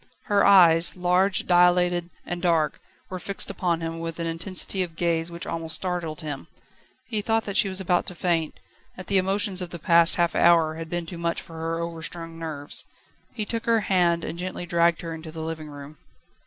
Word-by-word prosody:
Her 205 -1 +2
eyes, 165 -5 +6
large, 180 +1 +1
dilated, 175 -1 +3 0.2
and 175 0 -4
dark, 165 -4 +1 0.3
were 185 - -4
fixed 200 +1 -1
upon 175 -3 -1
him 165 0 -4
with 165 0 -5
an 170 - -2
intensity 180 +3 -1
of 170 -3 -4
gaze 165 -1 0
which 170 0 -5
almost 160 -1 -3
startled 175 -3 -3
him. 145 -3 -6 0.6
He 220 -4 -2
thought 225 +1 0
that 200 - -4
she 200 - +3
was 190 0 -2
about 180 -2 +1
to 180 - -5
faint, 165 -3 -1 0.4
that 185 - -8
the 195 -1 +3
emotions 195 0 0
of 180 - -4
the 170 - -7
past 170 +1 +4
half 170 -2 +1
hour 165 -2 +4
had 165 0 -7
been 175 0 -3
too 170 0 -8
much 170 0 -1
for 165 - -11
her 165 0 -3
overstrung 165 0 -6
nerves. 150 -3 -2 0.5
He 215 -3 -2
took 230 +2 -4
her 230 -1 +3
hand, 175 -4 +2
and 170 - -5
gently 180 -1 -4
dragged 170 -1 +2
her 165 -1 -4
into 160 0 -8
the 160 0 -6
living 160 -1 -5
room. 145 0 -11
170 Hz, 200 wpm, -25 LUFS, 165-185 Hz, 0.6 s, eyes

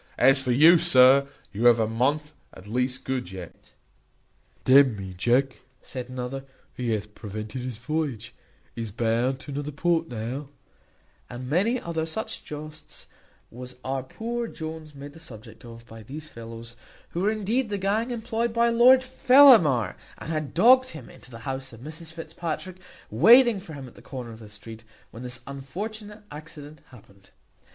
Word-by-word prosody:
As 135 0 +5
for 130 -2 -1
you, 160 +7 +7
sir, 130 +1 +6 0.3
you 110 +4 -2
have 120 -1 +7
a 110 - +2
month 140 +7 -1 0.2
at 95 - -13
least 125 +4 -2
good 130 -8 -3
yet." 90 -3 -11 0.9
"D 130 +2 +8
n 135 -5 +3
me, 95 -1 -7
Jack," 125 +8 +1 0.2
said 125 -1 -7
another, 130 +1 -5 0.3
"he 125 -2 -3
hath 105 0 -4
prevented 110 +5 -7
his 125 -3 -5
voyage; 125 -3 -3 0.4
he's 115 -2 -5
bound 120 +4 0
to 145 - -9
another 145 +1 -4
port 165 +2 0
now;" 125 +5 -5 0.8
and 125 +1 -7
many 200 - +1
other 160 -4 -3
such 220 +7 -5
jests 150 0 -10 0.5
was 125 +1 -9
our 135 0 -2
poor 230 - -4
Jones 160 -4 -8
made 140 +1 -10
the 165 - -14
subject 110 -8 -11
of 115 -1 -12
by 115 -1 -12
these 150 +8 -9
fellows, 115 -1 -10 0.3
who 175 - -4
were 200 - +2
indeed 220 +3 -1
the 205 - -2
gang 205 +5 0
employed 235 0 -2
by 235 +1 +2
Lord 250 +3 +6
Fellamar, 250 - +6 0.2
and 160 - -7
had 155 -3 -4
dogged 255 +7 +6
him 150 -7 -10
into - - -14
the 115 -2 -10
house 135 -1 -5
of 115 - -13
Mrs 155 +3 -8
Fitzpatrick, 165 +2 -6 0.3
waiting 235 - +6
for 170 -4 -11
him 135 -2 -8
at 120 - -14
the - - -16
corner 125 -4 -8
of 110 - -11
the 110 -2 -12
street 110 +2 -11 0.3
when 115 - -10
this 125 0 -6
unfortunate 205 - -7
accident 150 0 -10
happened. 100 -5 -19
140 Hz, 170 wpm, -25 LUFS, 120-170 Hz, 0.9 s, D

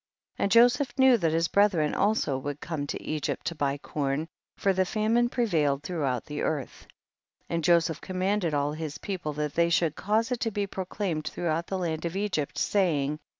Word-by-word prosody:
And 200 - +1
Joseph 245 +3 +4
knew 265 -1 +6
that 165 -6 +1
his 165 +1 +2
brethren 185 -7 +3
also 205 -9 +1
would 145 +2 -4
come 150 -4 -4
to - - -4
Egypt 155 -2 -3
to 165 - -1
buy 140 -3 -1
corn, 145 +1 -2 0.3
for 195 - +2
the 185 0 +2
famine 225 +5 +1
prevailed 155 - +1
throughout 145 -7 -2
the 150 0 -5
earth. 145 -5 -3 0.6
And 165 -1 -2
Joseph 165 -2 +3
commanded 185 -1 -1
all 145 0 +1
his 155 -1 -5
people 175 -6 -4
that 150 -1 -3
they 170 +1 +3
should 165 -2 +2
cause 220 +5 0
it 250 - -1
to 230 - 0
be 205 -1 -2
proclaimed 185 -4 -3
throughout 170 -1 -2
the 190 - -2
land 165 -3 -2
of 170 +1 -3
Egypt, 195 -8 -2
saying, 150 -7 +1
33. - - -39
170 Hz, 190 wpm, -27 LUFS, 150-200 Hz, 0.6 s, knew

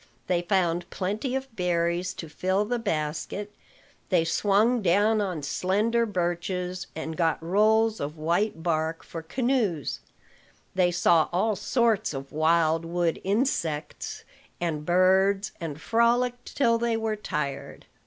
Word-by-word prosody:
They 175 -1 +1
found 175 -1 0
plenty 210 +7 -2
of 265 -3 -5
berries 175 0 0
to 175 -3 -7
fill 185 +6 0
the 240 +2 -1
basket; 165 +2 -3 0.6
they 175 -4 +3
swung 210 +8 +2
down 205 +4 +3
on 180 -7 -3
slender 215 +10 +1
birches, 180 -1 -2
and 160 0 -4
got 165 -2 +1
rolls 215 +5 +3
of 150 +3 -4
white 170 +3 0
bark 160 -1 -1
for 165 - -7
canoes; 215 - -1 0.7
they 185 -1 +3
saw 170 -2 +3
all 205 +5 +1
sorts 230 - +1
of 135 0 -7
wild 160 +1 +2
wood 170 0 -1
insects 185 - -2 0.4
and 155 -3 -3
birds; 190 +3 +3
and 155 -3 -5
frolicked 240 +4 +1
till 230 -4 +3
they 230 -1 0
were 220 -1 -1
tired. 140 -8 -4
185 Hz, 130 wpm, -26 LUFS, 165-215 Hz, 0.7 s, they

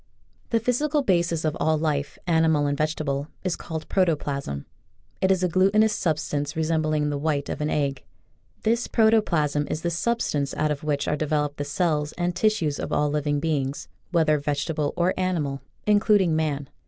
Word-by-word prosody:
The 230 - +2
physical 285 +6 +1
basis 170 -6 +1
of 155 0 0
all 155 +1 +2
life, 150 -2 -1
animal 160 -3 +3
and 145 0 0
vegetable, 150 -2 -1 0.2
is 185 -2 0
called 160 -2 -6
Protoplasm. 145 - -1 0.6
It 190 - +3
is 190 -1 +2
a - - +4
glutinous 195 +5 +3
substance 150 -3 -1
resembling 155 -2 0
the 145 - -2
white 145 -2 -1
of - - -4
an 150 - 0
egg. 140 -3 -1 0.6
This 230 +2 +1
protoplasm 170 - +2
is 155 - -3
the 170 - 0
substance 170 -7 -1
out 155 0 +1
of 150 +1 -3
which 145 -2 -1
are - - +1
developed 150 -1 -1
the 145 - -3
cells 150 -1 0
and 175 0 -2
tissues 180 -7 +1
of - - -4
all 150 0 +1
living 145 -1 0
beings, 140 -3 -2 0.2
whether 155 -4 +3
vegetable 145 +1 -1
or 175 +2 +2
ani 185 -1 0
mal, 140 -2 -4 0.2
including 205 -5 +4
man. 145 -3 -1
155 Hz, 170 wpm, -25 LUFS, 145-180 Hz, 0.6 s, a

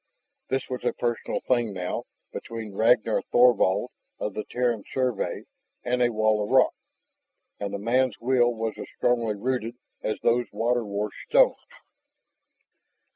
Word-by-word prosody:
This 135 +1 -1
was 125 -1 -5
a - - +1
personal 120 -1 -2
thing 120 -4 +1
now, 90 -1 -3 0.3
between 115 -3 -6
Ragnar 110 +1 +3
Thorvald 120 -6 +4 0.3
of 105 - -3
the 105 - -4
Terran 120 -4 0
Survey 125 -5 -1 0.4
and 125 0 0
a 120 -1 +3
wall 110 -1 +2
of 105 - -5
rock, 130 0 +5 0.9
and 100 -1 -3
the 100 - -3
man's 120 +2 +1
will 120 0 +3
was 115 -1 -3
as - - -6
strongly 115 -3 +1
rooted 120 +1 -2 0.3
as 110 - -2
those 120 +1 +2
water 120 +1 0
washed 105 0 -4
stones. - - +5
115 Hz, 140 wpm, -26 LUFS, 105-125 Hz, 0.9 s, rock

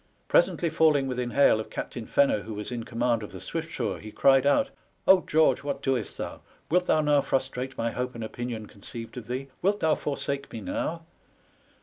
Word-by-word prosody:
Presently 180 - +3
falling 155 -3 +4
within 125 -2 -2
hail 130 -3 +4
of 110 - -5
Captain 120 -3 -5
Fenner, 140 -7 +3
who 110 0 -7
was 105 +3 -5
in 120 -2 -4
command 120 -1 0
of 105 - -7
the - - -8
Siviftsure, - - -3
he 110 - -9
cried 135 +2 +4
out, 270 - +3 0.2
" - - -40
Oh, 190 -1 +7
George, 160 +1 +4
what 140 -1 -3
doest 130 -5 -1
thou? - - -5 0.3
Wilt 180 +1 +3
thou 155 - +4
now 150 -1 +4
frustrate 130 -1 -2
my 115 0 0
hope 125 +1 -3
and 115 - -5
opinion 115 0 -5
conceived 115 +4 -9
of 120 - -7
thee? 130 +3 -4
Wilt 200 +3 +2
thou 160 -1 +4
forsake 140 -1 -3
me 115 - -5
now?" 165 +10 -3
130 Hz, 200 wpm, -27 LUFS, 115-150 Hz, 0.3 s, Oh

